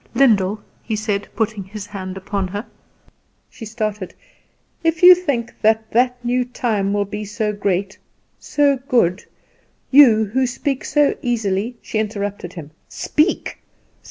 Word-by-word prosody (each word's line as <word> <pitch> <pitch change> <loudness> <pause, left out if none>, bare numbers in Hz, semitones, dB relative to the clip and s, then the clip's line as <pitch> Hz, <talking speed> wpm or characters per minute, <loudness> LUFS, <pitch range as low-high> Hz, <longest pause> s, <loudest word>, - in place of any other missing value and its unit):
"Lyndall," 215 -6 +3 0.2
he 220 - -3
said, 210 -1 -2
putting 215 -3 -1
his 205 +1 -8
hand 190 -2 -7
upon 195 0 -3
her 205 +5 -5 0.9
she 225 - -10
started 215 -3 -4 0.7
"if 330 +1 0
you 365 +1 +12
think 285 -10 -2
that 220 0 +2
that 245 +1 +1
new 250 +1 +1
time 225 -5 -1
will 205 0 0
be 210 +1 -6
so 210 +1 -2
great, 195 -1 -2 0.4
so 285 -2 +2
good, 205 - +2 0.7
you 240 -6 +7
who 255 +5 0
speak 270 +2 -3
so 295 -1 +2
easily 225 -1 -1
" - - -40
She 215 - -2
interrupted 205 -4 -4
him. 155 -4 -9 0.2
"Speak! 310 +4 -1
215 Hz, 140 wpm, -20 LUFS, 200-245 Hz, 0.9 s, you